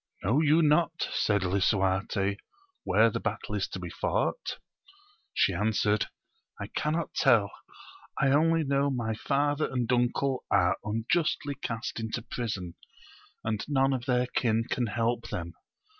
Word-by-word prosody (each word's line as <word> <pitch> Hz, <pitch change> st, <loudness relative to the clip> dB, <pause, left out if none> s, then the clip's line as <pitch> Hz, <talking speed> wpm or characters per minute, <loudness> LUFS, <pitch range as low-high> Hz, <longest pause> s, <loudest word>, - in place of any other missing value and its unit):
Know 120 Hz, +11 st, +3 dB
you 160 Hz, +2 st, +4 dB
not, 165 Hz, +2 st, +2 dB
said 100 Hz, -2 st, +1 dB
lisuarte, 95 Hz, +1 st, +1 dB, 0.5 s
where -, -, +4 dB
the -, -, -2 dB
battle -, -, -4 dB
is -, -, -1 dB
to -, -, -6 dB
be -, -, -6 dB
fought? -, -, -1 dB, 0.7 s
She 95 Hz, -, +2 dB
answered, 105 Hz, +2 st, +1 dB, 0.5 s
I 100 Hz, -, -5 dB
cannot 155 Hz, +2 st, -1 dB
tell: 100 Hz, -4 st, +3 dB, 0.7 s
I 140 Hz, -, +3 dB
only 160 Hz, +3 st, +3 dB
know 140 Hz, 0 st, +1 dB
my 120 Hz, -4 st, -1 dB
father 145 Hz, +6 st, 0 dB
and 125 Hz, -1 st, 0 dB
uncle 125 Hz, +2 st, +1 dB
are 90 Hz, -3 st, +3 dB
unjustly 140 Hz, +7 st, 0 dB
cast 120 Hz, -4 st, -4 dB
into 110 Hz, +1 st, -3 dB
prison, 105 Hz, -8 st, -4 dB, 0.7 s
and 110 Hz, -1 st, -2 dB
none 135 Hz, -2 st, +2 dB
of 125 Hz, -2 st, -3 dB
their 125 Hz, -1 st, +2 dB
kin 115 Hz, -2 st, +1 dB
can 120 Hz, -2 st, -1 dB
help 115 Hz, +2 st, -1 dB
them. 85 Hz, -3 st, -5 dB
120 Hz, 140 wpm, -28 LUFS, 105-140 Hz, 0.7 s, you